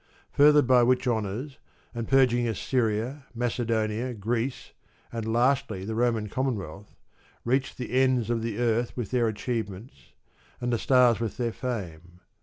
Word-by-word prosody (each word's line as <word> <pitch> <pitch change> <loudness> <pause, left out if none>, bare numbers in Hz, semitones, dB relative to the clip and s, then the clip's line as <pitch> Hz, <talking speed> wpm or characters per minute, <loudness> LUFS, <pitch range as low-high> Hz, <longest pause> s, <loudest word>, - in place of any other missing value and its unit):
Furthered 150 0 +5
by 125 -1 +5
which 125 +2 +2
honours 115 +4 -2 0.3
and 115 -2 -4
purgings, 120 -3 +3
Assyria, 120 +4 -1
Macedonia, 115 0 -1
Greece, 115 +5 -3 0.4
and 115 -1 -3
lastly 120 -5 +1
the 110 - -3
Roman 115 -2 0
Commonwealth, 105 - -4 0.5
reached 130 +3 0
the 125 - -6
ends 130 -2 +2
of 115 -1 0
the 115 -2 -3
earth 120 0 0
with 120 -5 -4
their 120 -2 +2
achievements, 110 - -5 0.5
and 120 0 -1
the 115 - 0
stars 125 -4 +4
with 115 -3 -3
their 120 -3 -1
fame. 90 -9 -6
120 Hz, 140 wpm, -27 LUFS, 110-125 Hz, 0.5 s, Furthered